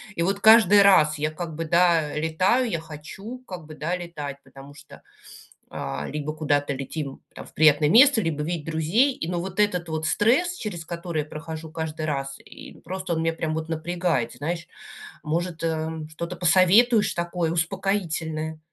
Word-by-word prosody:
И 170 Hz, -, 0 dB
вот 195 Hz, +2 st, 0 dB
каждый 215 Hz, -2 st, +7 dB
раз 155 Hz, -6 st, +5 dB
я, 155 Hz, +1 st, 0 dB
как 165 Hz, 0 st, -6 dB
бы, 165 Hz, +1 st, -4 dB
да, 170 Hz, -2 st, +3 dB
летаю, 185 Hz, +11 st, +1 dB
я 165 Hz, -, -2 dB
хочу, 165 Hz, +10 st, -9 dB
как 180 Hz, -4 st, -8 dB
бы, 155 Hz, -, -10 dB
да, 160 Hz, +4 st, -2 dB
летать, 150 Hz, -6 st, -7 dB
потому 135 Hz, +1 st, -14 dB
что, 145 Hz, 0 st, -15 dB, 0.7 s
э, 70 Hz, +1 st, -5 dB
либо 150 Hz, 0 st, -4 dB
куда-то 145 Hz, -2 st, 0 dB
летим 140 Hz, +1 st, -6 dB
там -, -, -9 dB
в -, -, -17 dB
приятное 150 Hz, -1 st, +5 dB
место, 250 Hz, -, +6 dB
либо 160 Hz, -5 st, -2 dB
видеть 165 Hz, -2 st, -3 dB
друзей, 170 Hz, -, +2 dB
и 165 Hz, -, -5 dB
но 175 Hz, -1 st, -2 dB
вот 190 Hz, +2 st, -7 dB
этот 180 Hz, -5 st, +1 dB
вот 160 Hz, 0 st, -2 dB
стресс, 280 Hz, -, +2 dB
через 175 Hz, -6 st, -6 dB
который 170 Hz, -2 st, -4 dB
я 150 Hz, -, -12 dB
прохожу 160 Hz, 0 st, -8 dB
каждый 160 Hz, -1 st, -4 dB
раз, 135 Hz, -2 st, -3 dB
и -, -, -13 dB
просто 185 Hz, 0 st, -3 dB
он 160 Hz, -, -1 dB
меня 165 Hz, 0 st, +1 dB
прям 160 Hz, -1 st, -3 dB
вот 160 Hz, 0 st, -4 dB
напрягает, 165 Hz, -6 st, -1 dB
знаешь. 165 Hz, +3 st, -4 dB, 0.6 s
Может, 165 Hz, +2 st, -2 dB
эм, 160 Hz, -1 st, -3 dB
что-то 170 Hz, +3 st, -6 dB
посоветуешь 190 Hz, +6 st, +4 dB
такое 170 Hz, -1 st, -2 dB
успокоительное? 165 Hz, -3 st, -2 dB
165 Hz, 175 wpm, -24 LUFS, 155-180 Hz, 0.7 s, каждый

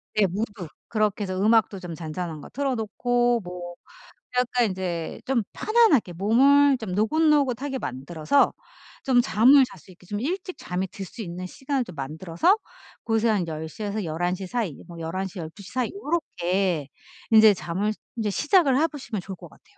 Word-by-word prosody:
네 215 Hz, -, +4 dB
무드. 200 Hz, -2 st, -4 dB, 0.2 s
그렇게 215 Hz, -2 st, 0 dB
해서 185 Hz, -1 st, -3 dB
음악도 215 Hz, -2 st, +3 dB
좀 175 Hz, -3 st, -7 dB
잔잔한 160 Hz, 0 st, -5 dB
거 -, -, -11 dB
틀어 275 Hz, -1 st, -1 dB
놓고 240 Hz, +2 st, +1 dB
뭐 175 Hz, -1 st, -7 dB, 0.6 s
약간 245 Hz, -3 st, +2 dB
이제 175 Hz, -3 st, -4 dB
좀 255 Hz, -4 st, +1 dB
편안하게 430 Hz, -, +3 dB
몸을 270 Hz, +9 st, +5 dB
좀 220 Hz, -6 st, -6 dB
노곤노곤하게 275 Hz, -, +2 dB
만들어서 155 Hz, -, +1 dB, 0.5 s
좀 250 Hz, -2 st, +4 dB
잠을 260 Hz, +6 st, +6 dB
잘 195 Hz, -, -11 dB
수 185 Hz, -, -18 dB
있게 180 Hz, 0 st, -18 dB
좀 205 Hz, +2 st, -4 dB
일찍 365 Hz, +6 st, -3 dB
잠에 180 Hz, +1 st, -3 dB
들 195 Hz, -1 st, -8 dB
수 225 Hz, -, -8 dB
있는 180 Hz, -1 st, -6 dB
시간을 265 Hz, +5 st, -2 dB
좀 180 Hz, -, -11 dB
만들어서 165 Hz, -, +1 dB, 0.5 s
그래서 225 Hz, 0 st, +2 dB
한 195 Hz, -6 st, +1 dB
10:00에서 200 Hz, +7 st, -4 dB
11:00 175 Hz, +4 st, -2 dB
사이. 205 Hz, -, -2 dB
뭐 170 Hz, -1 st, -11 dB
11:00 185 Hz, +4 st, -4 dB
12:00 175 Hz, +4 st, -9 dB
사이 255 Hz, -2 st, -1 dB
요렇게 190 Hz, -, -1 dB, 0.4 s
이제 220 Hz, -1 st, +8 dB
잠을 185 Hz, +5 st, -2 dB, 0.2 s
이제 220 Hz, -2 st, -1 dB
시작을 300 Hz, -, +3 dB
해 320 Hz, -, +4 dB
보시면 255 Hz, -, -6 dB
좋을 190 Hz, +1 st, -7 dB
것 -, -, -12 dB
같아요. -, -, -22 dB
210 Hz, 305 characters per minute, -25 LUFS, 180-255 Hz, 0.6 s, 이제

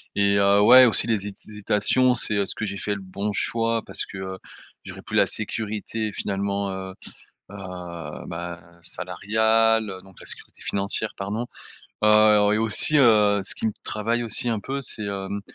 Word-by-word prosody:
Et, 100 Hz, 0 st, +2 dB
heu, 100 Hz, 0 st, +4 dB
ouais, 125 Hz, +5 st, +8 dB
aussi 115 Hz, -, +3 dB
les 105 Hz, -3 st, -1 dB
hésitations, 105 Hz, +5 st, 0 dB
c'est, 115 Hz, -3 st, +1 dB
heu, 100 Hz, -, +1 dB
est-ce -, -, -2 dB
que 110 Hz, -, -4 dB
j'ai 100 Hz, -1 st, -5 dB
fait 105 Hz, +1 st, -3 dB
le 100 Hz, -, -8 dB
bon 100 Hz, +2 st, -4 dB
choix? 115 Hz, +2 st, -1 dB
Parce -, -, -5 dB
que, 95 Hz, -, -10 dB
heu, 95 Hz, 0 st, -6 dB, 0.5 s
j'aurais -, -, -9 dB
plus -, -, -3 dB
la -, -, +4 dB
sécurité 110 Hz, 0 st, -2 dB
finalement, 100 Hz, 0 st, -3 dB
heu 95 Hz, 0 st, -7 dB, 0.6 s
heu, 90 Hz, -4 st, -8 dB
ben, 85 Hz, 0 st, -8 dB
salariale, 110 Hz, +3 st, 0 dB
donc 95 Hz, -2 st, -18 dB
la -, -, -11 dB
sécurité -, -, -10 dB
financière 100 Hz, +2 st, -1 dB
pardon. 105 Hz, +5 st, -4 dB, 0.6 s
Heu, 105 Hz, -1 st, +5 dB
et 105 Hz, -, +1 dB
aussi, 115 Hz, +7 st, +5 dB
heu, 105 Hz, -5 st, +4 dB
ce 95 Hz, -, 0 dB
qui -, -, -3 dB
me 110 Hz, -, -1 dB
travaille 115 Hz, +3 st, -2 dB
aussi 120 Hz, +1 st, -1 dB
un 110 Hz, -2 st, -2 dB
peu, 140 Hz, +5 st, -5 dB
c'est, 110 Hz, -4 st, -1 dB
hem, 100 Hz, 0 st, -4 dB
105 Hz, 175 wpm, -23 LUFS, 100-110 Hz, 0.6 s, ouais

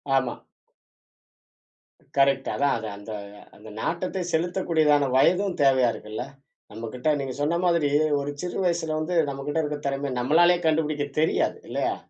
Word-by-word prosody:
ஆமா. 130 Hz, -2 st, +1 dB, 1.8 s
கரெக்ட் 135 Hz, -1 st, +3 dB
அதான் 140 Hz, 0 st, +2 dB
அத 110 Hz, -1 st, -6 dB
அந்த 100 Hz, +2 st, -10 dB, 0.4 s
அந்த 110 Hz, +1 st, -13 dB
நாட்டத்தை 180 Hz, +3 st, -2 dB
செலுத்தக்கூடியதான 160 Hz, -4 st, +2 dB
வயதும் 185 Hz, +7 st, +3 dB
தேவையா 130 Hz, -3 st, +4 dB
இருக்குல்ல! 110 Hz, +3 st, -6 dB, 0.5 s
நம்மகிட்ட, 125 Hz, +7 st, -1 dB
நீங்க 130 Hz, -2 st, -4 dB
சொன்ன 165 Hz, +4 st, +1 dB
மாதிரி 170 Hz, -4 st, +2 dB, 0.3 s
ஒரு 140 Hz, +1 st, -3 dB
சிறு 180 Hz, +2 st, -3 dB
வயசுல 165 Hz, -3 st, 0 dB
வந்து 170 Hz, +3 st, -2 dB, 0.2 s
நம்மகிட்ட 145 Hz, +4 st, -2 dB
இருக்க 150 Hz, 0 st, -3 dB
திறமைய 135 Hz, -1 st, -3 dB
நம்மளாலயே 175 Hz, +6 st, +4 dB
கண்டுபுடிக்க 155 Hz, -2 st, 0 dB
தெரியாது. 160 Hz, -, +1 dB
இல்லயா? -, -, -1 dB
150 Hz, 130 wpm, -25 LUFS, 135-170 Hz, 1.8 s, தேவையா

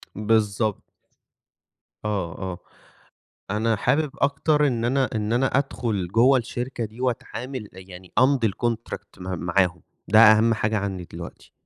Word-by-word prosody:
بالضب 105 Hz, -1 st, +1 dB, 1.3 s
آه، 95 Hz, -6 st, -2 dB
آه. 95 Hz, -2 st, -5 dB, 0.9 s
أنا 110 Hz, +2 st, +1 dB
حابب 145 Hz, +7 st, +1 dB
أكتر 145 Hz, +1 st, +2 dB
إن 120 Hz, -3 st, -1 dB
أنا 130 Hz, +1 st, +1 dB
إن 105 Hz, +1 st, -1 dB
أنا 130 Hz, +3 st, +2 dB
أدخُل 115 Hz, -9 st, -1 dB
جوّه 125 Hz, +7 st, +4 dB
الشركة 120 Hz, 0 st, -4 dB
دي 110 Hz, +4 st, -11 dB
وأتعامل، 125 Hz, -2 st, -4 dB
يعني 95 Hz, -1 st, -12 dB
أمضي 130 Hz, -3 st, +4 dB
الcontract 115 Hz, -4 st, -4 dB
م 90 Hz, -2 st, -4 dB
معاهم، 90 Hz, -1 st, +1 dB, 0.3 s
ده 110 Hz, +4 st, +5 dB
أهَم 110 Hz, +1 st, +7 dB
حاجة 110 Hz, 0 st, 0 dB
عندي 95 Hz, -3 st, -3 dB
دلوقتي. -, -, -10 dB
110 Hz, 130 wpm, -24 LUFS, 100-125 Hz, 1.3 s, أهَم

